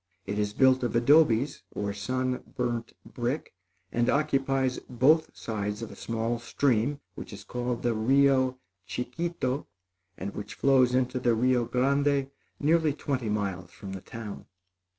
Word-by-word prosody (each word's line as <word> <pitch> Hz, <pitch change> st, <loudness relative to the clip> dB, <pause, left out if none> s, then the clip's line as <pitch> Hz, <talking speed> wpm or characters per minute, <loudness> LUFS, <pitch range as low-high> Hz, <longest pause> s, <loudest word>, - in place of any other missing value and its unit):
It 105 Hz, +1 st, -2 dB
is 105 Hz, 0 st, 0 dB
built 130 Hz, +2 st, +4 dB
of 120 Hz, -1 st, -1 dB
adobes, 135 Hz, 0 st, +4 dB
or 100 Hz, -1 st, -2 dB
sun 130 Hz, +5 st, -2 dB, 0.2 s
burnt 120 Hz, -2 st, -2 dB
brick, 125 Hz, +5 st, -3 dB, 0.4 s
and 120 Hz, 0 st, +1 dB
occupies 135 Hz, -3 st, +1 dB
both 145 Hz, +6 st, +4 dB
sides 105 Hz, -1 st, -3 dB
of 115 Hz, -, -6 dB
a -, -, -10 dB
small 115 Hz, +1 st, -2 dB
stream 130 Hz, +2 st, +1 dB
which -, -, -9 dB
is -, -, -9 dB
called 125 Hz, -1 st, -3 dB
the 120 Hz, -1 st, +2 dB
Rio 130 Hz, +3 st, +3 dB, 0.3 s
Chicito 130 Hz, -, -2 dB, 0.5 s
and 100 Hz, +1 st, -5 dB
which 105 Hz, +1 st, -7 dB
flows 130 Hz, -2 st, +4 dB
into 130 Hz, 0 st, +1 dB
the 120 Hz, -2 st, +2 dB
Rio 125 Hz, +1 st, +2 dB
Grande 140 Hz, +3 st, +1 dB, 0.3 s
nearly 155 Hz, 0 st, +3 dB
twenty 130 Hz, -6 st, -2 dB
miles 100 Hz, -4 st, -2 dB
from 95 Hz, +1 st, -9 dB
the 95 Hz, -, -6 dB
town. 110 Hz, -2 st, -8 dB
125 Hz, 145 wpm, -28 LUFS, 115-135 Hz, 0.5 s, built